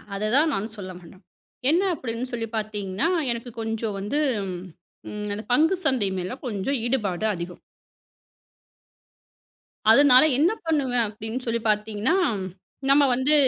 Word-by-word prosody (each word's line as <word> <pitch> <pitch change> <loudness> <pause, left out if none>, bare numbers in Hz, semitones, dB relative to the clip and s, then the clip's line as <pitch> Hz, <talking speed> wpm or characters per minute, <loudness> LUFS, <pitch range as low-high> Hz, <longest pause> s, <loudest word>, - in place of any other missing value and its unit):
அதுதான் 240 +10 +2
நான் 215 +3 -3
சொல்ல 185 -2 -7
மாட்டேன். 180 +2 -16 0.5
என்ன 350 +5 +3
அப்பிடின்னு 250 -3 -4
சொல்லிப் 225 -1 -4
பாத்தீங்கன்னா, 210 - -2 0.2
எனக்கு 235 +1 -5
கொஞ்சம் 225 -2 -3
வந்து, 210 +10 -1 0.9
ம், 210 0 -5
அந்த 215 - -5
பங்குச் 335 +6 +3
சந்தை 240 -8 +2
மேல 185 +8 -4
கொஞ்சம் 240 +5 -2
ஈடுபாடு 215 -6 0
அதிகம். 175 +1 -7 2.3
அதனால 265 +1 +7
என்ன 325 +7 +4 0.2
பண்ணுவேன் 260 -6 +2
அப்பிடின்னு 220 +4 -6
சொல்லிப் 230 -1 -1
பாத்தீங்கன்னா, 210 - +1 0.7
நம்ம 285 +1 +6
வந்து 260 +4 +2
230 Hz, 120 wpm, -24 LUFS, 210-265 Hz, 2.3 s, அதனால